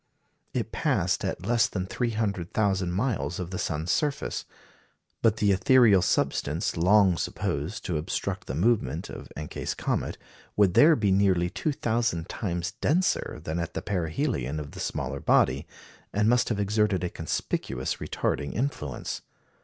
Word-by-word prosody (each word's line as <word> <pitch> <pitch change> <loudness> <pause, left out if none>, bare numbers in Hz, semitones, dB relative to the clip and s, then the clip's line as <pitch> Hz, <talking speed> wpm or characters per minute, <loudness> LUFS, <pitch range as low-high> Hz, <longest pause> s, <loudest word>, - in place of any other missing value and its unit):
It - - -2
passed - - +1
at 90 - -3
less 120 +1 +3
than 95 -2 -3
300,000 100 -4 -1
miles 100 -2 -1
of 90 0 -4
the 95 - -3
sun's 80 +2 -1
surface. 145 - -1 0.8
But 110 -2 +3
the 105 -2 +3
ethereal 105 0 +5
substance - - 0
long 95 +1 +4
supposed 75 +6 -3
to 85 -5 -1
obstruct 75 - -3
the 65 - -3
movement 100 - +1
of - - -9
Encke's 75 0 -4
comet - - -2 0.4
would 100 -4 +4
there 155 - +7
be 105 -6 +1
nearly 95 -3 +3
2,000 115 - -1
times 90 -3 -3
denser 175 - +1
than 80 +1 -2
at 85 - -4
the - - -3
perihelion 80 - -1
of 70 -1 -7
the - - -10
smaller 65 +1 -3
body, - - +2 0.4
and 105 +1 +2
must 120 +1 +3
have 110 -3 -1
exerted 105 -2 +1
a 90 - 0
conspicuous 80 - -2
retarding 70 - -2
influence. 95 - -3
95 Hz, 145 wpm, -27 LUFS, 85-110 Hz, 0.8 s, there